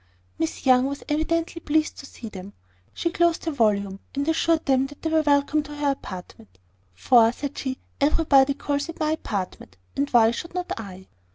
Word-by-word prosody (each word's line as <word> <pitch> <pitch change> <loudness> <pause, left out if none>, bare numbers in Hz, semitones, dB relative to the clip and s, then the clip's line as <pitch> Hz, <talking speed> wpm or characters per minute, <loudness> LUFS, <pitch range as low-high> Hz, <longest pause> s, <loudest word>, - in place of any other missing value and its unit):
Miss 160 - -3
Young 255 0 +5
was 280 0 -5
evidently 330 +2 -1
pleased 310 +1 +1
to 275 - -9
see 230 - -10
them. 195 -1 -9 0.4
She 335 - -2
closed 340 -1 +1
her 325 - 0
volume, 200 -7 +1 0.2
and 280 +1 -1
assured 325 0 +2
them 265 -1 +2
they 290 +3 -5
were 320 0 +4
welcome 290 0 +2
to 295 0 -9
her 290 -1 +1
apartment; 180 - -9 0.4
"For," 230 - +5
said 285 +3 -6
she, 260 -1 -3 0.2
"everybody 280 -2 +4
calls 285 +2 -2
it 330 - -8
my 310 -1 +1
apartment, 190 - -4 0.2
and 280 +1 0
why 230 -2 +5
should 335 +9 -6
not 360 0 -3
I?" 190 -4 -9
280 Hz, 180 wpm, -24 LUFS, 225-310 Hz, 0.4 s, Young